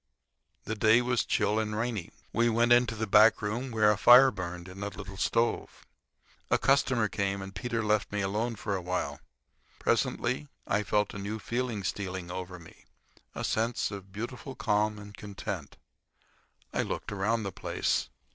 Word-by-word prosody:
The 110 - -3
day 110 +2 +4
was 125 -1 +1
chill 105 +1 +1
and 105 -1 -2
rainy. 115 -6 -2 0.2
We 120 0 +3
went 120 +1 +4
into 120 -2 +3
the 110 +1 -2
back 110 +2 +6
room, 115 +5 -3
where 110 -3 +4
a 105 - -1
fire 130 +2 +8
burned, 90 -2 -6
in 95 +2 -10
a 100 - -2
little 95 -1 -8
stove. 115 +4 -1 0.6
A - - +4
customer 130 -5 +3
came, 100 -1 -1
and 95 0 -7
Peter 115 +2 -2
left 105 0 +1
me 105 0 -1
alone 110 +5 -1
for 105 -1 -3
a 95 - -3
while. 90 +1 -3 0.6
Presently 130 +5 0 0.2
I 105 - +1
felt 105 0 0
a 100 - -6
new 100 +2 -4
feeling 120 -2 -3
stealing 95 -2 -4
over 90 0 -6
me—a 85 -2 -13
sense 115 +1 0
of 100 -1 -8
beautiful 120 +5 -6
calm 105 +1 +1
and 105 0 -10
content, 100 -6 -6 1.0
I - - +1
looked - - -4
around 105 +3 0
the 100 - -3
place. 60 - -1
105 Hz, 165 wpm, -29 LUFS, 100-115 Hz, 1.0 s, fire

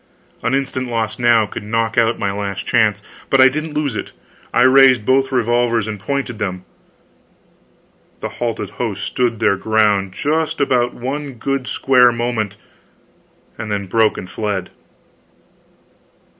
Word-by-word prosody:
An 120 - 0
instant 130 -2 -2
lost 115 0 -2
now 120 -2 +4
could - - -7
knock 115 +2 -1
out 115 0 +2
my 100 - -1
last 100 -1 -4
chance. 105 -2 +2 0.3
But 135 - +3
I 130 0 +8
didn't 155 +2 -5
lose 150 -4 -1
it. - - -6 0.4
I 120 - +3
raised 130 -3 +6
both 135 +2 +2
revolvers 120 -2 +1
and 105 -2 -5
pointed 125 +1 -3
them 95 -2 -4 1.5
the - - -4
halted 115 -4 -4
host 105 -3 -4
stood 120 -3 -1
their 105 -3 +2
ground 105 -2 +1
just 160 +7 -1
about 125 -4 +1
one 140 +3 -4
good 135 +2 -3
square 125 -2 +4
moment, 115 -4 -2 1.0
then 105 -2 -3
broke 110 +3 +2
and 90 - -6
fled. 100 -1 -3
115 Hz, 140 wpm, -18 LUFS, 105-130 Hz, 1.5 s, I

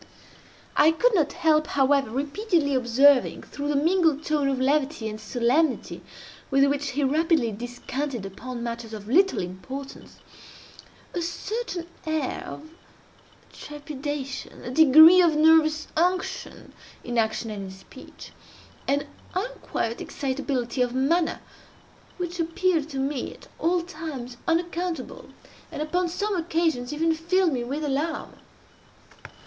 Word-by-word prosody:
I 300 - +6
could 450 +10 +2
not 315 -7 +2
help, 310 -2 +2
however, 275 -2 +2
repeatedly 290 - 0
observing, 260 +2 +4
through 285 0 -6
the 295 - 0
mingled 320 0 +2
tone 295 -3 +1
of 265 -1 -1
levity 275 -3 +1
and 215 0 -6
solemnity 250 +7 0 0.5
with 275 0 +4
which 285 +1 0
he 290 +2 0
rapidly 300 -3 +2
descanted 245 +2 -5
upon 235 +5 -7
matters 235 -1 -5
of 210 -1 -8
little 375 - +3
importance, 260 +10 -8 1.0
a 350 - -2
certain 380 +1 -4 0.2
air 315 -4 -1
of 310 +1 -9 0.8
trepidation—a 290 -3 -6
degree 315 +5 +8
of 335 -3 +3
nervous 310 0 +4
unction 360 +3 -1 0.3
in 240 -1 -1
action 220 0 -1
and 200 -2 -5
in - - -7
speech—an 270 +8 -7 0.3
unquiet 370 - -3
excitability 260 -2 -2
of 245 0 0
manner 320 +6 +1 0.8
which 350 -1 -4
appeared 330 -1 0
to 275 - -6
me 270 -1 -2
at - - -17
all 345 +1 +1
times 305 -8 -7
unaccountable, 340 -3 -2 0.4
and - - -6
upon 350 +3 0
some 405 +4 -2
occasions 325 -7 0
even 325 +2 +1
filled 340 +1 +1
me 245 -2 -1
with 280 +6 -4
alarm. 295 +3 -2
290 Hz, 120 wpm, -25 LUFS, 255-330 Hz, 1.0 s, degree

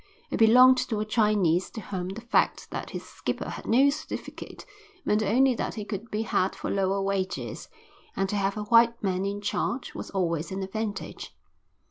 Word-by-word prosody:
It - - -1
belonged 250 +3 +7
to 220 - -1
a 215 - -1
Chinese 210 -5 +2
to 225 - -8
whom 185 -2 -4
the 200 +4 -6
fact 235 - +1
that - - -5
his - - -6
skipper - - -4
had - - -8
no 270 +5 +5
certificate 310 +2 -7 0.4
meant 210 +1 +2
only 250 +6 +3
that - - -3
he 210 -2 -5
could 210 +2 -5
be 215 +1 -1
had 190 -3 0
for - - -4
lower 195 0 +1
wages, 195 -1 -3 0.5
and 195 - 0
to 205 - -3
have 200 0 0
a 210 - -2
white 230 +2 +4
man 190 0 0
in 200 +1 -4
charge 240 +4 -2
was - - -7
always 170 -4 -1
an 190 0 -3
advantage. 205 +1 -5
210 Hz, 185 wpm, -27 LUFS, 195-230 Hz, 0.5 s, belonged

